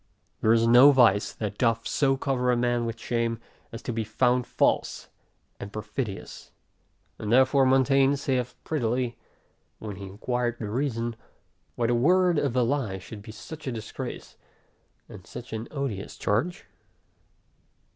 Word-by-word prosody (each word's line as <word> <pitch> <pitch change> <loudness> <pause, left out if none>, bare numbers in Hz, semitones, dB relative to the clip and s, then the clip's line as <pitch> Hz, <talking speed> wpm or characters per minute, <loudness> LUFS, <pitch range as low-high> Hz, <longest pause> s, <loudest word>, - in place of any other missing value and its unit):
There 110 - +4
is 115 0 +4
no 120 +4 +8
vice, 115 -7 +4
that 105 -3 -5
doth 115 -2 +1
so 135 -2 +2
cover 125 -2 0
a 120 - +2
man 120 -1 +1
with 115 0 -5
shame, 115 -1 -1 0.3
as 115 +1 -8
to 120 - -3
be 110 0 -1
found 125 +3 +1
false - - 0 0.5
and 100 - -7
perfidious. 105 0 -6 0.7
And 105 - -3
therefore 130 +2 +5
Montaigne 135 +1 +4
saith 130 -3 -2
prettily, 125 -4 -1 0.6
when 105 -3 -7
he 100 -1 -7
inquired 120 +4 -2
the 105 -3 -5
reason, 120 -2 -1 0.6
why 120 - 0
the 120 - +2
word 175 +6 +3
of 140 -4 0
the 125 -1 +2
lie 120 -7 -1
should 100 +3 -10
be 110 +1 -10
such 145 +9 -10
a - - -1
disgrace, 110 -2 -7 0.7
and - - -12
such - - -9
an 110 +1 -4
odious 135 -9 -4
charge? 165 - -1
120 Hz, 150 wpm, -26 LUFS, 110-135 Hz, 0.7 s, no